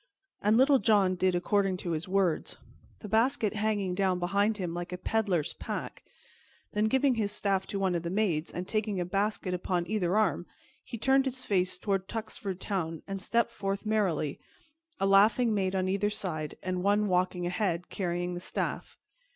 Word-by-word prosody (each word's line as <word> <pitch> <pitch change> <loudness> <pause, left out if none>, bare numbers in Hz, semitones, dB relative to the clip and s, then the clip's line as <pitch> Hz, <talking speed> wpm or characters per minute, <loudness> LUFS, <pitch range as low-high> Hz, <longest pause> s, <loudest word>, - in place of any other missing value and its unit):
And 210 +2 +3
Little 270 +1 +5
John 200 -5 +3
did 185 0 +1
according 190 +1 +1
to 175 -1 -4
his 160 +2 -3
words, 185 -3 0 0.4
the 210 - -7
basket 225 0 +2
hanging 210 -3 0
down 190 -1 +1
behind 200 +4 +1
him 180 -4 -3
like 175 +1 -5
a 180 - -4
peddler's 195 -8 0
pack; - - -6 0.7
then, 210 +1 +2
giving 265 +4 +3
his 215 -3 -1
staff 195 -2 0
to 200 - -3
one 190 -2 +1
of 170 - 0
the 170 - -4
maids, 180 -5 0
and 180 +1 -5
taking 215 -3 -1
a 175 - -1
basket 195 0 -1
upon 180 -1 -1
either 195 -1 0
arm, 195 -4 +1 0.4
he 235 - -7
turned 265 +4 +3
his 260 -1 -2
face 185 -2 +1
toward 195 0 -1
Tuxford 210 -4 -5
Town 165 -6 -3
and 195 -1 -4
stepped 235 +4 +1
forth 195 +1 -3
merrily, 195 -9 0 0.6
a 195 - +1
laughing 215 +4 +5
maid 190 -2 0
on 185 0 0
either 200 +2 +1
side, 155 -7 -4
and 185 -1 -2
one 205 +2 +2
walking 180 -1 +1
ahead, 180 -1 -1
carrying 175 -1 -2
the 175 - -4
staff. - - -3
195 Hz, 180 wpm, -29 LUFS, 180-215 Hz, 0.7 s, Little